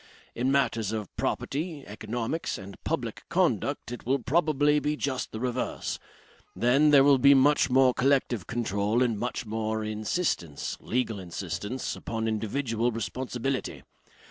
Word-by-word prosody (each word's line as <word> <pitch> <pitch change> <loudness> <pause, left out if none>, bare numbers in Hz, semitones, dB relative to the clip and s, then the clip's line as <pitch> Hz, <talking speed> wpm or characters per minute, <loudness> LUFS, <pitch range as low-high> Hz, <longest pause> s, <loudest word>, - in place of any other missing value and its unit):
In 125 +3 0
matters 115 -6 +1
of 110 -4 -5
property, 150 0 -2
economics 115 +8 -3
and 100 0 -11
public - - -2
conduct - - 0
it 120 - -6
will 135 +3 +2
probably 150 +1 +2
be 150 +1 -1
just 135 -3 -2
the 110 - -5
reverse. 125 0 -2 0.6
Then, 135 +6 +4
there 140 -2 +7
will 140 -1 +5
be 140 +2 +7
much 145 +2 +4
more 130 0 +5
collective 130 -6 +1
control 110 0 0
and 120 -3 +1
much 125 +1 -3
more 110 0 -2
insistence, 105 - -2
legal 115 -3 -1
insistence, 95 +6 -4
upon 115 0 -3
individual 115 +2 -1
responsibility. 125 +3 -3
120 Hz, 135 wpm, -28 LUFS, 110-140 Hz, 0.6 s, there